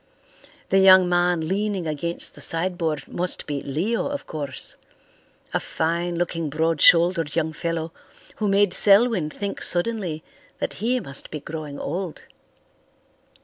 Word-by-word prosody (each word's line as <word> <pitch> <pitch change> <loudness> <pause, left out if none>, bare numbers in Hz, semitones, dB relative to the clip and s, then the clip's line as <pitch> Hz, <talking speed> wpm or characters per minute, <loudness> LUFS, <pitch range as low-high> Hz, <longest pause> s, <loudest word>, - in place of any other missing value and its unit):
The 195 - +4
young 190 -1 +7
man 175 -2 +1
leaning 200 -1 -1
against 160 +2 -3
the - - -14
sideboard 165 -3 -1
must 180 0 -1
be 145 -2 -3
Leo, 175 - -1
of 285 0 -5
course; 145 -4 -5 0.8
a - - +2
fine 170 +2 -2
looking, 165 -2 -2
broad 160 +1 0
shouldered 170 -2 +5
young 160 -1 0
fellow 165 0 -3 0.5
who 215 - -1
made 200 -1 +3
Selwyn 200 -5 +4
think 200 +5 -5
suddenly 175 -4 0 0.3
that - - -3
he 245 +3 +1
must 140 - -4
be 150 - -5
growing 150 -1 -7
old. 175 +2 -5
170 Hz, 135 wpm, -23 LUFS, 160-190 Hz, 0.8 s, young